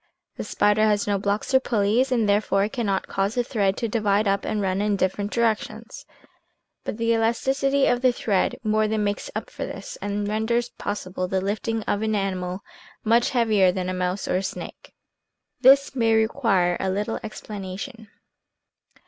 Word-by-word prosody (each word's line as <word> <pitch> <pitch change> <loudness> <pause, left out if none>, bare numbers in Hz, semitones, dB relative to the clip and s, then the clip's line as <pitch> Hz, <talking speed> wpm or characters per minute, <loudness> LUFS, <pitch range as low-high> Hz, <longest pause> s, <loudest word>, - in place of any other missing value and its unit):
The - - -5
spider 210 +1 +2
has 210 -1 +2
no 205 -1 0
blocks 200 +5 -1
or 265 - +7
pulleys, 235 +2 +1
and, 230 -4 +2
therefore, 200 -1 +2
it 210 - -3
cannot 205 -7 -1
cause 195 +2 -1
the 245 - +1
thread 205 -6 0
to 230 - -1
divide 210 -1 +1
up 200 0 0
and 215 - -1
run 190 -1 0
in 210 0 +1
different 200 +1 -1
directions, 225 0 -2 0.8
but - - -4
the 230 0 +1
elasticity 270 +5 +1
of 245 0 +2
the 255 -1 +4
thread 205 -5 0
more 215 0 +2
than 215 0 0
makes 205 0 -2
up - - -5
for - - -5
this, - - -7
and 205 0 -2
renders 230 +3 0
possible 185 -4 -4
the 190 +1 0
lifting 215 +3 -2
of 205 - -1
an 220 -1 0
animal 185 -1 -2 0.4
much 230 +2 +3
heavier 215 -7 +3
than 185 0 -3
a - - -2
mouse 180 +1 -2
or - - +1
a - - -1
snake. 195 - -7 0.7
This 270 +2 +5
may 225 -3 +3
require 220 -6 +2
a 190 - -1
little 205 +4 -2
explanation. 215 +2 -7
210 Hz, 175 wpm, -24 LUFS, 195-230 Hz, 0.8 s, or